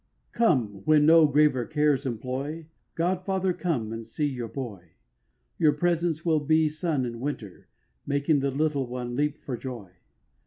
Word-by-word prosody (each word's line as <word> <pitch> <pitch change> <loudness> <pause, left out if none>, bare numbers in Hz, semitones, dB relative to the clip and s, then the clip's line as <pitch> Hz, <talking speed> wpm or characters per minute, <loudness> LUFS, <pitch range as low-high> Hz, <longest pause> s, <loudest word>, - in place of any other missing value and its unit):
Come, 120 - +1
when 150 -1 +5
no 160 0 +7
graver 145 -3 +3
cares 150 -3 +1
employ, 130 +7 -4 0.3
God 180 +2 0
father, 190 -1 0
come 130 -13 -2
and 115 0 -5
see 115 +7 -3
your 125 -5 -3
boy: 105 - -8 0.7
Your 155 -2 +4
presence 170 0 0
will 160 -2 +3
be 155 +1 +2
sun 155 -4 -1
in 115 -1 -6
winter, 120 -8 -6 0.4
Making 140 +1 +2
the 140 0 0
little 140 -1 0
one 120 0 -5
leap 150 +2 0
for 130 - -3
joy. 120 -7 -7
145 Hz, 155 wpm, -26 LUFS, 125-160 Hz, 0.7 s, no